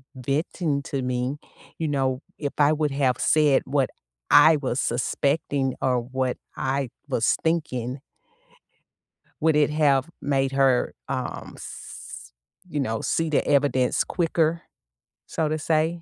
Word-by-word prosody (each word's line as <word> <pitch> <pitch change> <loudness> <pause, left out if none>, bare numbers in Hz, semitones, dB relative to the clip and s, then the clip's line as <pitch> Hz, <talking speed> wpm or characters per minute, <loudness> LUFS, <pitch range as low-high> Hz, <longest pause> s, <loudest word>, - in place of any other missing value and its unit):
venting 140 +3 -1
to 135 -1 -3
me, 125 +2 -2 0.4
you 160 - -1
know, 135 -2 0 0.2
if 145 -2 -3
I 150 +1 +5
would 150 -1 0
have 135 -3 +1
said 150 -3 +4
what 135 -1 +1 0.4
I 160 0 +8
was 135 -3 -2
suspecting 140 +2 0
or 125 -2 +2
what 130 +1 -2 0.2
I 135 -1 -1 0.2
was 115 - +2
thinking 135 -6 -1 1.4
would 160 -1 +3
it 150 -1 +4
have 145 -2 +2
made 135 -1 0
her, 135 -2 +2
um, - - -4
s - - -10 0.4
you 150 -3 -3
know, 115 -5 -1
see 165 -1 0
the 150 - +2
evidence 140 -3 +2
quicker, 165 -1 0 0.7
so 155 -2 -1
to 155 - 0
say? 160 +2 0
140 Hz, 130 wpm, -25 LUFS, 130-155 Hz, 1.4 s, I